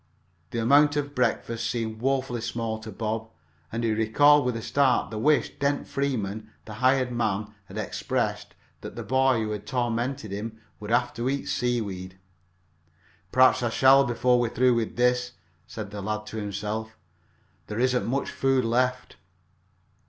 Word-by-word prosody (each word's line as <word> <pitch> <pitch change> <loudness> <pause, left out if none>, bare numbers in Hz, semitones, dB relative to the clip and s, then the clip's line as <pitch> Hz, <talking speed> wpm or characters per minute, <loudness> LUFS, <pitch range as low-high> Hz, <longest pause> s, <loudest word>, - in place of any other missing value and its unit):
The - - -5
amount 145 +6 +4
of 145 -1 -2
breakfast 115 -3 -1
seemed 110 -2 -3
woefully 130 -2 0
small 115 -1 -3
to 110 0 -9
Bob, 110 +2 -3 0.4
and 115 +1 -3
he 115 - +1
recalled 135 +7 +4
with 125 -2 0
a 115 - -4
start 135 -5 +2
the 110 - -4
wish 150 +6 +2
Dent 140 0 0
Freeman, 110 -6 -2 0.2
the 110 - -8
hired 130 -1 +3
man, 105 -3 -1
had - - -10
expressed, - - -2 0.2
that - - -9
the - - -5
boy 130 -3 +2
who 105 -1 -3
tormented 120 +1 -2
him 110 +2 -5 0.2
would 105 - -8
have 120 +1 +2
to 120 +2 -2
eat 140 0 -2
seaweed. 100 -7 -2 1.1
"Perhaps 130 0 +5
I 120 - 0
shall 135 +4 +6
before 125 -1 +2
we're 120 -1 +1
through 125 +2 +3
with 115 -2 -1
this," 125 0 +1 0.3
said 105 -3 -7
the 105 -1 -6
lad 105 +2 -3
to 110 - -7
himself. 105 +1 -4 0.7
"There 105 +2 -4
isn't 125 0 +2
much - - -1
more 135 +1 0
food 135 -2 +1
left." 125 +2 0
120 Hz, 160 wpm, -26 LUFS, 110-130 Hz, 1.1 s, shall